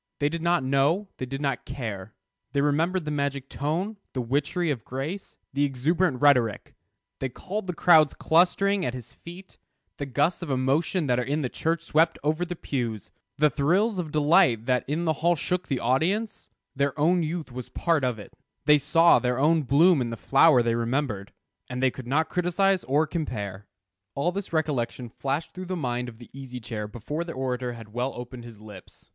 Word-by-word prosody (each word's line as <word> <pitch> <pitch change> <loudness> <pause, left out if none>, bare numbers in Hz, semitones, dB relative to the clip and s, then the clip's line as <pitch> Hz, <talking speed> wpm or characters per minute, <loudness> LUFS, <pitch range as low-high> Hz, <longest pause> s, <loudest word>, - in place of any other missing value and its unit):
They 145 0 +1
did 165 +1 -4
not 170 -3 +2
know; 140 +9 +1
they 130 - -4
did 135 +2 -5
not 135 -4 -1
care. 110 -7 -6 0.4
They 140 - +2
remembered 160 +5 +1
the 150 - -2
magic 140 -2 -2
tone, 175 +9 -2 0.2
the 130 - -1
witchery 145 +7 0
of 120 -6 -4
grace, 145 +10 -6 0.2
the 140 +2 +1
exuberant 145 +2 +1
rhetoric; 125 -7 +3 0.5
they 135 - -1
recalled 190 - -5
the 180 - -2
crowds 160 -4 +5
clustering 185 +4 +3
at 125 -4 -2
his 120 -2 -9
feet, 180 +3 -13 0.4
the 140 - -4
gusts 145 +7 +1
of 170 - -5
emotion 140 +6 +1
that 125 -2 +1
in 140 +5 -1
the 125 - -1
church 165 +4 -1
swept 165 0 +2
over 155 +3 +1
the 175 0 -4
pews, 120 - -4 0.3
the 150 0 +4
thrills 185 +8 +1
of 160 -4 -4
delight 145 -7 +4
that 125 -1 +1
in 155 +5 -1
the 160 - +2
hall 175 +1 +3
shook 180 +4 -2
the 135 -4 -1
audience; 175 - 0 0.3
their 140 +1 -1
own 175 +4 +3
youth 160 -3 -3
was 125 0 -7
part 165 -5 0
of 125 -3 0
it; 105 - -11 0.3
they 150 0 +6
saw 165 +4 +5
their 125 -1 0
own 155 +4 +3
bloom 150 +4 +4
in 120 - -1
the 115 - -5
flower 135 0 +5
they 115 0 +1
remembered, 115 -4 -2 0.4
and 125 0 -4
they 130 0 +3
could 130 -1 -9
not 155 +5 +1
criticise 180 +2 +1
or 145 +4 +2
compare. 105 - -5 0.5
All 155 +6 +1
this 195 +1 -5
recollection 135 -6 -1
flashed 140 +6 -3
through 185 0 -8
the 185 - -2
mind 125 -4 -2
of 115 - -13
the 120 - -14
Easy 130 -2 -8
Chair 110 -2 -5
before 125 +9 -4
the 170 -1 -7
orator 125 -1 -2
had 115 -2 -12
well 125 +3 -2
opened 120 0 -8
his 115 -3 -12
lips. 105 -4 -13
140 Hz, 195 wpm, -26 LUFS, 125-165 Hz, 0.5 s, they